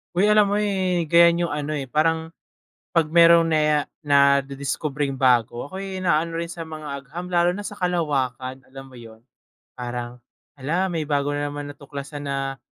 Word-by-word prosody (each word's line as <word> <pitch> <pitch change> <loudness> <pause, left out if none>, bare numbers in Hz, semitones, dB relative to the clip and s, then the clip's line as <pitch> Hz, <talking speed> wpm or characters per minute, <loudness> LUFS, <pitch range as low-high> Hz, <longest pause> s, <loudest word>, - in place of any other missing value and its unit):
Hoy 185 +3 +3
alam 210 -1 +4
mo, 205 - +1
eh, 190 -4 0
ganyan 170 +2 +5
yung 165 - -4
ano, 150 0 -3
eh, 140 - -4
parang 160 +4 0 0.6
'pag 165 - +5
meron 170 -1 +6
na 155 - +3
ya 150 0 +3 0.2
nadidiskubreng 140 0 +1
bago, 125 -1 +1
ako'y 190 +2 -6
naaano 165 -1 0
rin 170 - -4
sa 165 0 -7
mga 155 -1 -8 0.2
agham, 170 +6 -7
lalo 175 0 +2
na 195 - -6
sa 205 0 -7
kalawakan, 135 -8 -2
alam 135 0 -11
mo 130 - -15
'yon? 115 -2 -13 0.5
Parang, 120 0 -6 0.4
hala, 175 +8 -1
may 160 -3 -3
bago 145 -1 0
na 145 0 -2
naman 145 0 -6
natuklasan 145 0 -8
na 135 -1 -3
150 Hz, 170 wpm, -23 LUFS, 135-170 Hz, 0.6 s, meron